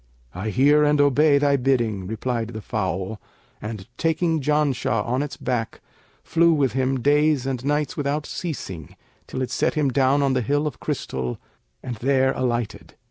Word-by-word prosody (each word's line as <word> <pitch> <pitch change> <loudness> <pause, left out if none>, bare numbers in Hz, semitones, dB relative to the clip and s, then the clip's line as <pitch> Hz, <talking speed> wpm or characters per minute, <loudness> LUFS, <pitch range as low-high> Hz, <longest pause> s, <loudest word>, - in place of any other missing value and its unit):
'I 95 +5 -4
hear 145 +6 +4
and 150 0 +3
obey 145 +1 +4
thy 140 0 +3
bidding,' 120 -7 0
replied 115 +2 -2
the 110 - -6
fowl; 95 -1 -3 0.4
and, 105 -3 -6
taking 165 -1 +1
Janshah 140 -6 +1
on 125 +3 0
its 145 -1 -5
back, 120 -3 -3 0.4
flew 170 0 +3
with 140 -4 +2
him 130 0 0
days 145 0 +3
and 130 -2 -3
nights 145 0 0
without 145 +1 -1
ceasing 95 - -6 0.3
till 130 - -3
it 125 - -4
set - - 0
him 150 -3 +2
down 135 +2 +2
on 135 -1 +2
the 130 - +1
Hill 145 +6 0
of 150 - -4
Crystal 65 -2 -3 0.5
and 120 -3 -5
there 130 +2 +2
alighted. 120 -4 -3
130 Hz, 165 wpm, -23 LUFS, 115-145 Hz, 0.5 s, hear